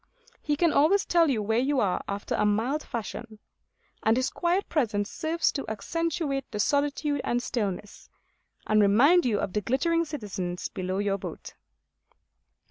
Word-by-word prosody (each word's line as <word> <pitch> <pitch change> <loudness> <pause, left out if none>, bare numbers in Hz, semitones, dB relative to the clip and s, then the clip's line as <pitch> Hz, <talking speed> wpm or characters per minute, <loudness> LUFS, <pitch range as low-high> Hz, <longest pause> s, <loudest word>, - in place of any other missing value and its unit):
He 295 - 0
can 335 +1 +2
always 345 +8 +4
tell 335 -2 +3
you 225 -6 0
where 220 +2 +1
you 270 +2 +1
are 185 -5 0
after 200 0 -4
a - - +1
mild 225 +8 +1
fashion; 235 -3 -6 0.6
and 220 +2 +3
his 255 - 0
quiet 350 +3 0
presence 210 -9 0
serves 325 +1 0
to 275 - -5
accentuate 290 - -2
the 210 - -5
solitude 285 +3 +1
and 240 - 0
stillness, 210 -5 -4 0.6
and 215 0 +3
remind 255 - +5
you 210 -4 +1
of 185 - -3
the 210 - 0
glittering 335 - +1
citizens 195 - -4
below 185 0 -3
your 200 -1 0
boat. - - -8
250 Hz, 155 wpm, -27 LUFS, 210-305 Hz, 0.6 s, remind